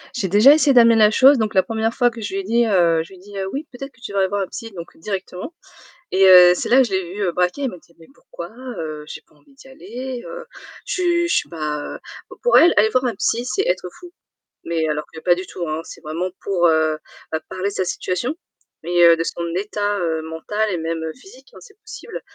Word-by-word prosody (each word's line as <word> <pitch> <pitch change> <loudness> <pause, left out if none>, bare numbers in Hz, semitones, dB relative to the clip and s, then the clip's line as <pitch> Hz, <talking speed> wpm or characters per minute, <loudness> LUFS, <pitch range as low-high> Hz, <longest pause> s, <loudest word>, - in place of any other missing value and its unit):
J'ai 195 - -1
déjà 210 +10 +7
essayé 300 -2 +3
d'amener 230 -2 +6
la 215 -1 +5
chose, 265 +5 +6
donc 220 -3 -1
la 190 - +4
1re 225 0 -2
fois 245 -1 +2
que 230 -1 -10
je 205 - -5
lui 195 - -1
ai - - -10
dit, 235 +4 +2
heu, 170 -6 +2
je 165 - -16
lui - - -13
dit: 205 +3 -15 0.2
«Oui, 285 +4 -5
peut-être 275 +2 -8
que 255 - -27
tu 240 - -7
devrais 195 -1 +1
voir 200 +1 -2
un 190 - -2
psy». 225 -2 -8
Donc 170 -1 -9
directement 190 - -6 0.6
et 190 +1 +4
heu, 180 -1 +9
c'est - - -4
là 260 +2 +6
je 235 - -5
l'ai 185 -2 -2
vu 195 -3 -1
braquer, 180 +11 0
il 265 - 0
m'a 180 - -10
dit: 170 - -24
«Mais 165 - -16
pourquoi? 170 -10 -10 0.3
Heu, 155 -2 -6
j'ai - - -8
pas - - -30
envie 150 - -25
d'y 270 0 -17
aller, 250 +1 -7
heu, 485 0 -8 0.4
je 370 - -2 0.2
je 340 - +1
suis - - 0
pas, 155 -3 -4 0.2
heu» - - -7 0.3
p - - -11
pour - - +4
elle, 345 - +6
aller 215 +1 +5
voir 255 +2 0
un 235 -4 -1
psy 235 +5 -1
c'est 390 +10 -1
être - - -1
fou. 355 -1 -12 0.5
Mais 165 -1 -1
alors 150 0 -2
que 160 - -9
pas 175 +2 +3
du 185 +1 -7
tout, 175 -2 -6
hein, 155 +1 -2
c'est - - -12
vraiment 165 +4 -3
pour, 180 -3 +1
heu, 160 -1 +2 0.3
bah, 160 - -1
parler 185 +2 -3
de - - -10
sa 185 - -1
situation, 185 - -3 0.5
mais 175 +1 +3
heu, 170 0 +7
de 165 - -2
son 170 0 -4
état, 205 +1 -2
heu, 160 -2 -1
mental 205 +7 -3
et 180 - -2
même 165 0 -3
physique, 385 - -17
hein, - - -12
c'est 415 -3 -18
possible 445 +1 -9
195 Hz, 250 wpm, -20 LUFS, 170-245 Hz, 0.6 s, heu